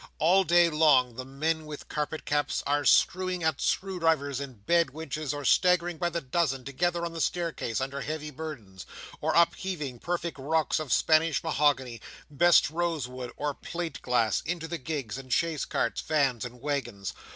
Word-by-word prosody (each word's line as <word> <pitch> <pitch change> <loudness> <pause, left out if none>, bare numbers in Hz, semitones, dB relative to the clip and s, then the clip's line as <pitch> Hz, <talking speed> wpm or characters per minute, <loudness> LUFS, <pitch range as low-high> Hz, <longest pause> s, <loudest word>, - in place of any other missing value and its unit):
All 180 +5 +4
day 175 -1 +5
long, 150 -6 +4
the 130 +2 -7
men 155 +4 -2
with 150 -1 -8
carpet 150 +1 -4
caps 145 0 0
are 145 0 +1
screwing 185 +2 +3
at 160 0 0
screw 190 -1 -1
drivers 145 -5 +1
and 130 -8 -9
bed 170 -1 +3
winches, 155 -2 -4
or 145 -1 -5
staggering 175 +1 +3
by 175 - +1
the 170 0 -2
dozen 135 -2 -1
together 170 +5 -1
on 170 - -5
the 165 - -4
staircase 165 -11 -1
under 135 +1 -3
heavy 150 0 -4
burdens, 125 - -8 0.3
or - - 0
upheaving 170 -6 +1
perfect 170 -1 -3
rocks 155 +4 +1
of 155 -5 -5
Spanish 155 -1 +3
mahogany, 140 -6 +1 0.3
best 170 +1 +5
rose 165 -5 -1
wood, 125 -1 -7
or 145 -1 -1
plate 170 0 -6
glass, 120 -4 +1
into 165 0 -3
the 170 0 -4
gigs 135 -5 -4
and 130 -1 -11
chaise 165 0 +1
carts, 115 - -1
vans 135 -6 +1
and 125 0 -9
waggons. 120 -9 -3
150 Hz, 175 wpm, -28 LUFS, 130-170 Hz, 0.3 s, day